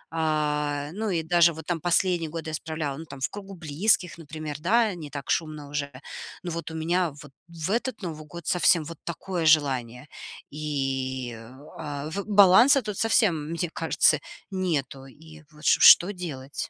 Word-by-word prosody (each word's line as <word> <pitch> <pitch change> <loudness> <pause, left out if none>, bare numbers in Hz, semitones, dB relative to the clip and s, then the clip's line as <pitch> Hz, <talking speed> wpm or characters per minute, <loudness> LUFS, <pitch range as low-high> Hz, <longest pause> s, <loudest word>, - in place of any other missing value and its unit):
А, 150 -2 -1
ну, 215 +3 -3
и 170 -4 -1
даже 170 +1 +4
вот 160 0 -10
там 170 -2 -2
последние 175 -1 +1
годы 160 0 -6
я - - -6
исправляла, 155 -3 -4
ну, 160 - -8
там, 140 -3 -11
в - - 0
кругу 195 -1 -9
близких, 175 +3 +1
например, 155 -2 -7
да, 220 +6 +2
не 155 -4 -8
так 140 -1 -8
шумно 155 -3 -2
уже. 140 -1 -3 0.5
Ну, 175 - -4
вот 165 -1 -5
у - - -7
меня 170 +2 0
вот 145 -3 -13 0.2
в 170 +1 -5
этот 245 +3 -2
Новый 155 -4 -6
год 170 +1 -10
совсем 175 -2 +3
вот 165 +1 -9
такое 170 0 -4
желание, 135 -5 +2 0.4
и, 135 -4 -3 0.4
а, 145 -1 -5
в 200 +3 -4
баланса 210 +7 +6
тут 210 -4 -5
совсем, 175 -9 +2
мне 170 +1 -2
кажется, 160 -2 +2 0.3
нету, 155 -8 -2
и 155 +3 -15
вот 150 0 -17
ш - - +4
что 180 +4 +8
делать? 145 -7 -6
160 Hz, 175 wpm, -26 LUFS, 150-175 Hz, 0.5 s, что